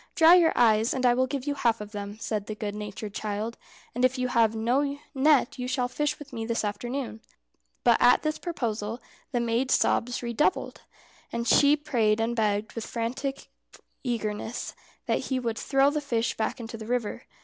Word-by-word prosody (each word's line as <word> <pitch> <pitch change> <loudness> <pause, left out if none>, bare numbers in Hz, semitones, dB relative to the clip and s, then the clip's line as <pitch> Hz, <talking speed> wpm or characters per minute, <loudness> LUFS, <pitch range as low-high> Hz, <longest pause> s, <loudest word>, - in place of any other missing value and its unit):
"Dry 325 +1 +8
your 345 -3 +6
eyes, 225 0 +4
and 255 -1 0
I 245 - +6
will 260 +1 +1
give 275 -1 -4
you 290 - 0
half 235 -5 +1
of 210 0 -8
them," 205 0 -6
said 210 -2 -3
the 215 - -4
good 210 -1 -4
natured 210 0 -6
child; 215 +2 -3 0.4
"and 245 - -2
if 255 +1 +3
you 255 0 -1
have 230 -3 +3
no 270 +6 +1 0.2
net 275 -2 +3
you 250 - -3
shall 255 -1 0
fish 295 +4 -1
with 290 -1 -12
me 225 - -3
this 230 -1 -1
afternoon." 230 +2 -4 0.6
But 235 - +4
at 245 +5 +5
this 310 0 -1
proposal 230 -9 -3 0.3
the 245 - 0
maid's 235 +3 +1
sobs 245 +1 +1
redoubled, 240 +9 0 0.5
and 235 0 -3
she 290 +1 +5
prayed 230 -8 +1
and 230 +1 0
begged 210 -1 0
with 230 - -5
frantic 250 +4 -4 0.5
eagerness 225 -2 -3 0.3
that - - +1
he 260 - -1
would 230 -3 -3
throw 275 +1 +3
the 300 0 -1
fish 235 -5 -1
back 220 +3 -2
into 225 -1 -7
the 220 -1 -8
river. 240 -3 -2
235 Hz, 190 wpm, -27 LUFS, 220-265 Hz, 0.6 s, Dry